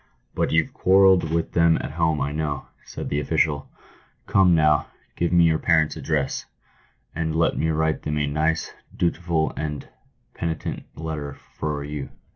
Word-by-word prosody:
" - - -45
But - - 0
youVe 80 -1 +1
quarrelled 95 -3 +4
with 85 0 0
them 85 -1 +4
at - - -5
home, 80 -2 0
I 70 +1 -1
know," 75 -2 -3 0.2
said - - -6
the 75 - 0
official. 75 -1 0 0.3
" - - -36
Come, 95 -3 +4
now, 75 -2 +3 0.3
give 85 - 0
me 85 -1 +5
your 80 -1 +3
parents' 80 -2 +2
address, 75 -4 -2 0.7
and 80 -1 -2
let 85 0 +2
me 80 - 0
write 80 0 0
them 75 0 -2
a 75 - +1
nice, 80 +3 -1 0.2
dutiful, 85 -2 0
and 75 -2 -4 0.5
penitent 80 -1 -4
letter 75 -3 -4
for 75 -1 -5
you." 75 -1 -5
80 Hz, 165 wpm, -24 LUFS, 75-85 Hz, 0.7 s, me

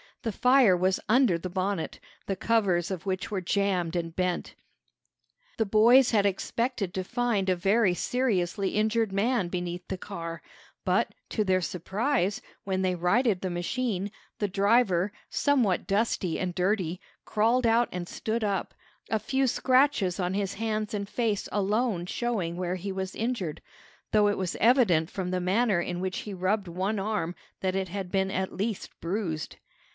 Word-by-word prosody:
The 225 - -1
fire 250 -4 +5
was 185 +1 +1
under 235 -6 +4
the 185 - -5
bonnet, 185 -1 -2 0.3
the 195 - -1
covers 190 -5 +1
of 190 0 -5
which 185 -1 -2
were 195 -3 -1
jammed 180 -2 0
and 165 -1 -3
bent. 180 -1 -1 1.0
The 225 - +2
boys 235 +5 +6
had 205 -3 +4
expected 200 0 -2
to 190 - -2
find 235 -3 0
a 185 - +3
very 195 +2 +3
seriously 200 -5 0
injured 220 0 +1
man 200 0 +1
beneath 175 0 -4
the 190 - -3
car, 170 -4 -6 0.4
but, - - +1 0.2
to 215 - 0
their 185 -2 +2
surprise, 200 - -1 0.2
when 190 -1 -1
they 185 -1 +2
righted 190 +4 +2
the 185 - -2
machine, 195 +3 -2 0.3
the 205 - 0
driver, 200 -1 +2 0.2
somewhat 250 -11 +1
dusty 195 -4 0
and 180 -1 -2
dirty, 180 -1 0 0.3
crawled 230 +4 +2
out 230 +1 +3
and 180 -1 -4
stood 225 +4 -2
up, 200 -3 -1 0.3
a 220 - +1
few 270 +4 0
scratches 255 -8 +2
on 180 0 0
his 200 -1 -1
hands 215 0 -2
and 200 -1 -4
face 220 -4 -1
alone 210 -2 0
showing 195 -7 -2
where 180 0 -1
he 190 +2 -4
was 190 0 -4
injured, 220 -9 -2 0.5
though 210 -1 +4
it 205 - +1
was 185 -2 -2
evident 215 - +4
from 185 -2 -3
the 185 0 0
manner 195 +1 +2
in 175 0 -3
which 185 0 -2
he 210 - -6
rubbed 190 +2 0
one 190 +5 -1
arm 195 -4 -2 0.3
that 185 -1 0
it 190 -1 -1
had 190 -1 -5
been 190 -1 +1
at 190 0 -2
least 205 +1 -2
bruised. 170 -3 -3
195 Hz, 165 wpm, -28 LUFS, 180-220 Hz, 1.0 s, boys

